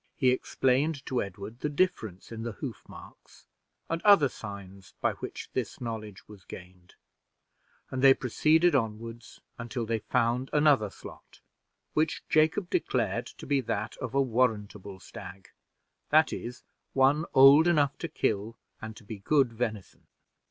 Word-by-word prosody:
He 130 -2 +3
explained 135 +3 0
to 130 -3 -1
Edward 100 +4 -8
the 150 - -2
difference 140 - -1
in 115 -1 -6
the 115 -1 -4
hoof - - -7
marks - - -15 0.4
and 165 +1 -2
other 200 -10 +6
signs 100 -4 -10
by - - +1
which - - -8
this - - -3
knowledge 110 -4 -7
was 105 -3 -14
gained, 90 0 -13 1.0
and 130 - -3
they 135 0 +7
proceeded 160 +7 +2
onward 115 -1 -2 0.4
until 120 0 -4
they 115 0 -1
found 120 +4 0
another 145 -8 +4
slot, - - -13 0.5
which 155 0 0
Jacob 160 +5 +2
declared 120 -5 -1
to - - -12
be 140 -1 +1
that 110 -2 -3
of 130 0 -6
a 140 - +4
warrantable 105 -6 -1
stag 95 -1 -11 0.6
that 155 +1 +4
is, 120 +2 -7 0.3
one 140 +4 +3
old 140 +5 +8
enough 145 -5 +2
to 165 - -3
kill 110 -6 -2 0.2
and 110 0 -8
to 120 - -14
be 105 0 -8
good 135 +2 +2
venison. 110 -4 -5
120 Hz, 145 wpm, -28 LUFS, 105-140 Hz, 1.0 s, old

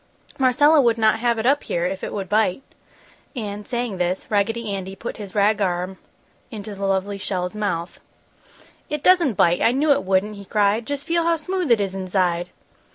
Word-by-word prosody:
"Marcella 290 +4 +5
would 235 -3 +2
not 220 0 +3
have 235 0 +1
it 220 - -2
up 280 +3 +3
here 170 0 -2
if 190 +1 -3
it - - -4
would 195 -2 -4
bite!" 210 +3 +1 0.7
And, 210 -3 -5
saying 240 -5 -3
this, 180 +1 -1
Raggedy 215 +1 0
Andy 190 0 -5
put 235 - -6
his 205 -2 -9
rag 210 +1 +3
arm 185 0 -2 0.5
into 210 -3 -7
the 195 0 -3
lovely 195 +1 -1
shell's 180 -1 -3
mouth. 185 -5 -3 0.9
"It 300 -1 -3
doesn't 345 - +4
bite! 175 0 +3
I 235 - +4
knew 290 +3 +2
it 280 - +3
wouldn't!" 195 +2 0
he 200 - -10
cried. 210 +3 +1
"Just 285 -1 -4
feel 335 0 +1
how 335 0 +2
smooth 360 +1 -3
it 235 -2 +5
is 195 -2 -2
inside!" 180 -2 -1
210 Hz, 190 wpm, -22 LUFS, 190-245 Hz, 0.9 s, Marcella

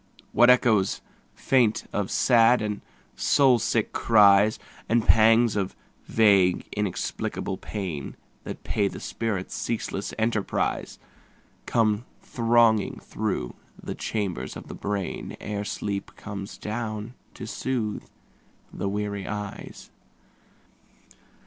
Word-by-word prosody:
What 120 +1 +5
echoes 110 -6 +4 0.4
faint 120 -5 +2
of 100 -2 -1
sad 120 0 +4
and 105 -1 -3 0.3
soul 130 -4 +4
sick 115 -1 0
cries, 105 -1 +5 0.3
And 115 -1 +2
pangs 115 0 +5
of 95 -2 -2 0.3
vague 100 -5 +3
inexplicable 105 -3 -3
pain 90 -9 -5 0.3
That - - -7
pay 100 -2 0
the - - -6
spirit's 105 -5 -3
ceaseless 110 -3 -3
enterprise, 110 -2 -1 0.7
Come 110 0 +1
thronging 115 -3 +2
through - - -3 0.3
the - - -5
chambers 95 - -3
of - - -11
the - - -6
brain 100 -2 -4
Ere 105 -1 -4
sleep 100 -1 -4
comes 100 -1 -7
down 110 +1 -4 0.2
to - - -7
soothe 115 -2 -3 0.7
the 100 - -2
weary 100 -1 -3
eyes. 105 -2 -7
105 Hz, 105 wpm, -26 LUFS, 100-115 Hz, 0.7 s, What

